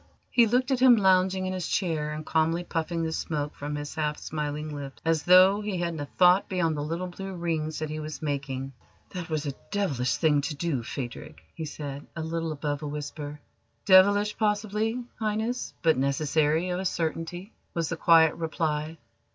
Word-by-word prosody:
He 235 -2 +5
looked 250 +4 +1
at 260 - +2
him 255 -1 +8
lounging 190 -2 +3
in 185 - -2
his 185 -2 -3
chair 155 -5 -1
and 155 0 -6
calmly 165 +2 +1
puffing 165 0 -2
the 160 - -1
smoke 150 -2 -3
from 145 +1 -5
his 145 0 -5
half 150 -1 -1
smiling 150 0 -4
lips 140 -2 -7
as 165 -1 +2
though 185 +4 +6
he 205 -3 -3
hadn't 170 -2 -2
a 145 - -4
thought 180 +1 +5
beyond 170 -4 0
the 145 - -3
little 165 +5 -3
blue 190 +1 -7
rings 160 -3 -2
that 155 -1 -3
he 155 - -4
was 155 0 -6
making. 135 -2 -3 0.4
"That 180 -2 -6
was 155 -1 -2
a 140 - -2 0.2
devilish 145 - 0
thing 150 -3 +3
to 150 +1 -3
do, 145 -4 -1
Phadrig!" 120 +1 -7
he 160 - -5
said, 145 -2 -7
a 160 - -4
little 165 0 -2
above 145 -1 -3
a 150 - -4
whisper. 150 0 -6 0.5
"Devilish, 205 +2 +5
possibly, 215 +2 0 0.2
Highness, 220 +3 -2
but 160 -4 +4
necessary, 150 +5 +1
of 180 - -1
a 190 - -3
certainty," 170 +3 -3 0.2
was 165 -2 -1
the - - -2
quiet 160 -1 +5
reply. 160 -1 -2
160 Hz, 185 wpm, -27 LUFS, 150-185 Hz, 0.5 s, him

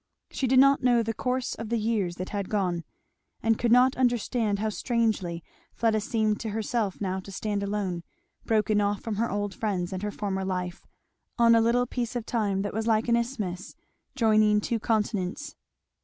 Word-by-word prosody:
She 265 - -1
did 260 +1 +3
not 275 +1 +6
know 245 -2 +3
the 225 0 -2
course 250 +2 -2
of 225 -1 -6
the 235 - +1
years 210 -5 0
that 185 +1 -5
had 200 -2 -3
gone, 180 -5 0 0.6
and 225 0 +2
could 235 - +1
not 250 +2 +5
understand 240 -4 +1
how 215 +2 -1
strangely 215 -7 -1 0.3
Fleda 220 -2 +1
seemed 215 -2 0
to 225 - -4
herself 215 -1 -2
now 190 -2 -2
to 195 +1 -10
stand 205 +1 -2
alone, 200 -4 -2 0.4
broken 215 -1 +2
off 205 0 0
from 220 -3 -4
her 230 +2 0
old 205 -1 -2
friends 190 -4 -2
and 185 - -4
her 210 - -2
former 195 -2 -3
life, 180 -2 -4 0.5
on 235 -1 +6
a 230 - +5
little 240 +2 +3
piece 245 -1 -3
of 240 -2 -3
time 205 -5 0
that 205 - -4
was 220 +1 -2
like 225 +1 +2
an 235 - +5
isthmus 220 -7 -3 0.4
joining 215 -3 +4
two 230 +2 -1
continents. 215 +3 -1
215 Hz, 185 wpm, -27 LUFS, 200-235 Hz, 0.6 s, not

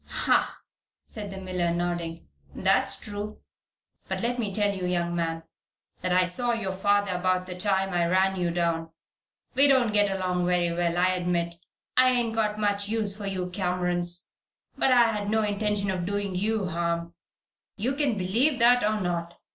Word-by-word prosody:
"Hah!" - - +1 0.4
said 210 -2 -7
the 195 - -7
miller, 180 -2 -1
nodding. 170 -1 -3 0.3
"That's - - +1
true. 210 0 -6 0.7
But - - -3
let 245 +1 -1
me 215 -4 -1
tell 205 0 0
you, 185 -1 -3
young 175 -1 -1
man, 165 -1 -2 0.6
that 185 - -1
I 180 0 +4
saw 240 +7 +1
your 215 -5 -2
father 200 +1 +1
about 185 0 0
the 185 - -6
time 195 0 0
I 170 -1 +2
ran 190 +2 +2
you 175 -2 0
down. 170 -1 -1 0.6
We 275 +2 +5
don't 255 -6 +3
get 205 -1 +4
along 180 -2 -1
very 175 -1 +2
well, 170 0 0
I 180 +1 +4
admit. 175 -2 -1 0.4
I 255 0 +6
ain't 240 -3 +1
got 215 -2 0
much 205 -1 0
use 215 -3 0
for 205 -1 -6
you 185 -2 -3
Camerons. 180 -1 -1 0.4
But 265 - +2
I 240 -2 +5
had 205 -2 -3
no 220 0 +2
intention 205 -1 0
of 185 -2 -2
doing 200 -1 -2
you 205 +1 -1
harm. 170 0 -2 0.6
You 240 +7 -1
can 275 -6 0
believe 230 +10 +1
that, 245 +1 +5
or 215 0 +1
not. 170 -1 -3
190 Hz, 175 wpm, -27 LUFS, 175-210 Hz, 0.7 s, I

